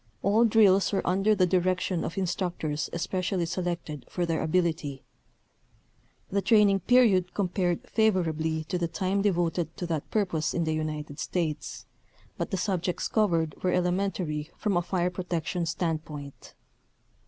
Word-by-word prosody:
All 215 +4 +4
drills 205 -4 +5
were 195 - -1
under 195 +4 +3
the 185 -2 +4
direction 180 -1 +1
of 170 - -5
instructors 170 -5 -2
especially 180 +1 -1
selected 170 -5 -3
for 175 - -1
their 165 -1 -1
ability. 160 -4 0 1.3
The 200 +1 +1
train 210 0 +5
ing 195 - +2
period 195 -4 +3
compared 180 -3 -1
favorably 160 -7 +1
to 180 +3 -3
the 170 - 0
time 190 +3 -1
de 205 0 +3
voted 175 -1 -1
to 180 - -3
that 160 -4 -3
purpose 175 -8 0
in 170 - +1
the 160 -1 0
United 155 -1 -4
States, 165 -5 -3 0.5
but - - -3
the 190 - -1
subjects 185 -2 -1
covered 165 -8 +1
were 180 - +1
elementary 180 -4 -1
from 210 -4 0
a 175 - +3
fire 180 0 -1
protection 175 -1 -2
standpoint. 155 -4 -4
180 Hz, 145 wpm, -28 LUFS, 160-190 Hz, 1.3 s, drills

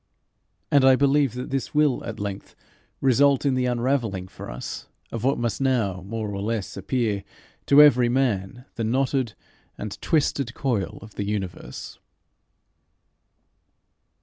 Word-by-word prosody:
And 140 -2 +5
I 130 0 +7
believe 140 -2 +2
that 125 +1 -5
this 135 +1 -3
will 150 -4 +3
at 115 - -6
length 100 -1 -6 0.5
result 140 +2 +4
in 140 - +3
the 130 -1 +1
unravelling 120 -6 -1
for - - -10
us - - -6 0.2
of 115 -1 -4
what 135 +2 +2
must 120 +2 -2
now, 115 -9 +1
more 105 +2 -4
or 100 - -4
less, 110 -1 -3
appear 110 -6 -1 0.4
to 145 +1 +8
every 125 -4 +5
man 120 -2 -1
the 115 - -1
knotted 130 0 0 0.4
and 105 -1 -6
twisted 140 -6 0
coil 115 -8 -1
of 110 -1 -12
the 100 - -1
universe. 100 -3 -5
120 Hz, 140 wpm, -24 LUFS, 105-135 Hz, 0.5 s, to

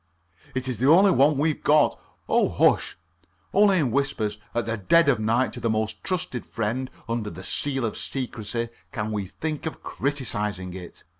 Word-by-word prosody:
It 130 0 -2
is 125 -5 -3
the 130 - +2
only 190 +5 +7
one 145 -2 +4
we've 155 +1 0
got. 150 0 +4 0.3
Oh, - - +3
hush! - - +2 0.6
Only 200 -1 +5
in 140 -8 +1
whispers 110 -6 -1 0.2
at 120 - 0
the 115 0 -1
dead 145 - +4
of 135 -5 +3
night 115 +4 +1
to 125 - -6
the 115 - -1
most 110 0 -1
trusted 165 -10 -2
friend 115 +4 -3 0.2
under 115 -2 -2
the 90 +1 -9
seal 135 +4 0
of 110 - -3
secrecy 115 -3 -4 0.2
can 105 -1 -3
we 100 -3 -2
think 155 - -4
of 160 - -7
criticizing 105 -9 -2
it. 90 -2 -10
120 Hz, 175 wpm, -25 LUFS, 110-145 Hz, 0.6 s, only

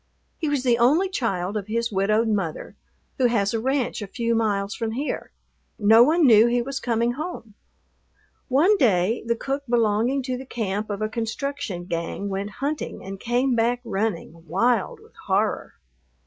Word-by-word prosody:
He 310 - -1
was 285 -3 0
the 240 -2 +2
only 305 +11 +4
child 200 - -2
of 205 -2 -3
his 230 +1 -1
widowed 215 +3 +2
mother, 195 -7 -2 0.4
who 255 - +5
has 205 -4 +1
a 225 - 0
ranch 260 -1 -1
a 205 - -5
few 235 +3 -1
miles 205 -3 0
from 225 -1 -3
here. 280 +5 -4 0.5
No 220 +2 +6
one 315 +6 +5
knew 225 -2 +7
he 240 +1 +2
was 270 +1 -4
coming 235 0 0
home. 250 - -6 0.9
One 320 +11 +4
day 215 - +2
the 235 - +2
cook 275 +4 -3
belonging 235 +3 +2
to 255 -1 -3
the 265 - -8
camp 215 -3 -3
of 205 +1 -3
a - - +1
construction 230 -3 -4
gang 170 +4 -3
went 195 +1 -3 0.2
hunting 295 -7 -4
and 195 0 -7
came 245 +4 +1
back 235 +1 +1
running, 195 -6 -3
wild 240 - +1
with 445 +1 -20
horror. - - 0
230 Hz, 170 wpm, -24 LUFS, 205-260 Hz, 0.9 s, knew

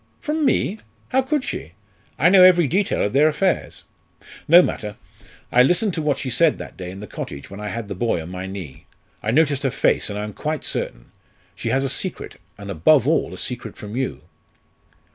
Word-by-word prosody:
"From 310 +1 -2
me! 220 -5 +1 0.3
how 265 - +3
could 265 +1 -1
she? 85 - -5 0.4
I 160 +6 +5
know 190 0 +7
every 180 -2 +7
detail 190 +9 0
of 100 - -1
their 145 +3 +5
affairs." 180 +4 -1 0.6
"No 175 +3 +8
matter. 105 - -4 0.6
I 125 - +6
listened 180 - +2
to 160 - -2
what 150 -2 0
she 130 - -4
said 165 +2 +3
that - - -9
day 90 -1 -7
in 95 +2 -9
the - - -6
cottage 70 -5 -8
when 100 - -8
I 105 - -5
had 115 +1 -5
the 100 - -4
boy 105 -1 0
on 80 +2 -8
my 90 +1 -5
knee. 95 -9 -9 0.3
I 105 - -3
noticed 145 +2 +2
her 135 - +1
face, - - +1
and 105 - -4
I 105 - -3
am 105 0 -6
quite 155 +6 -4
certain. - - -3 0.4
She - - -4
has 135 +1 +1
a - - 0
secret, 170 +7 -3 0.2
and - - -7
above 130 - +4
all 165 - +1
a - - -8
secret 120 -4 -6
from 105 +1 -8
you." 130 0 -3
135 Hz, 210 wpm, -22 LUFS, 105-170 Hz, 0.6 s, No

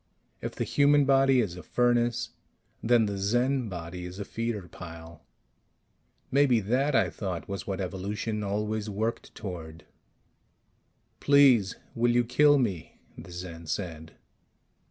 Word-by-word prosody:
If - - -5
the - - -1
human 145 0 +4
body 135 -1 +4
is 95 -6 -3
a 90 - -8
furnace, 120 +5 +1 0.5
then 115 -1 +4
the 100 -1 -3
Zen 120 +4 +1
body 90 0 -6
is 90 +1 -8
a 100 - -5
feeder 115 -5 -4
pile. 80 -2 -11 1.1
Maybe 135 -4 +4
that, 130 +7 0
I - - +3
thought, 95 -5 -5
was 100 -3 -5
what 95 -1 -3
evolution 100 +3 -3
always 105 +1 -2
worked 110 +3 -3
toward. 85 -5 -8 1.3
"Please, 135 -8 +5 0.2
will 120 +1 +2
you 120 0 +3
kill 145 +5 +4
me?" 100 - -2 0.2
the - - -11
Zen 85 -2 -8
said. 80 -2 -5
105 Hz, 135 wpm, -28 LUFS, 90-120 Hz, 1.3 s, Please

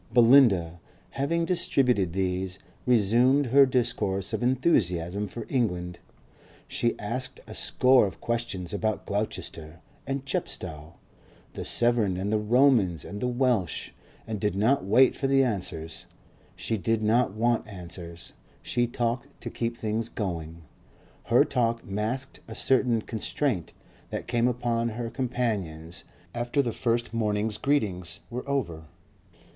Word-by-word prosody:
Belinda, 115 -9 +5 0.3
having 165 +5 0
distributed 125 - +1
these, 95 0 -1 0.3
resumed 125 +5 +4
her 135 +3 +6
discourse 115 -7 -1
of - - -1
enthusiasm 105 - +1
for 115 +3 -7
England. 90 -9 -1 0.7
She 120 - -1
asked 120 +5 -3
a - - -10
score 130 -4 +4
of 95 - -9
questions 115 -7 -3
about 110 +1 -1
Gloucester 85 -6 -4 0.3
and 135 0 -3
Chepstow, 80 - -4 0.6
the - - -5
Severn 120 -6 +2
and 100 +3 -2
the 110 - +2
Romans 110 - +3
and 100 0 -7
the 125 - 0
Welsh, 120 - 0 0.3
and 110 -2 -4
did 105 -2 0
not 110 +6 +2
wait 125 +7 +5
for 135 - -1
the 135 0 +4
answers. 90 -8 -3 0.5
She 110 - -2
did 110 +3 0
not 110 -1 +2
want 120 +1 +1
answers; 85 -3 -8 0.3
she 120 0 0
talked 120 +3 -3
to - - -5
keep 115 0 -3
things 110 +1 -2
going. 85 -5 -5 0.6
Her - - +5
talk 115 -2 0
masked 110 +7 -3
a 110 - -8
certain 120 -3 +2
constraint 110 - -2 0.4
that - - -4
came 120 0 +1
upon 120 -1 0
her 115 +1 -5
companions 100 - -3 0.3
after 120 +4 0
the 120 -3 -2
first 120 0 -1
morning's 105 -1 0
greetings 100 - -1
were 125 +3 -5
over. 85 - -2
115 Hz, 130 wpm, -27 LUFS, 95-125 Hz, 0.7 s, her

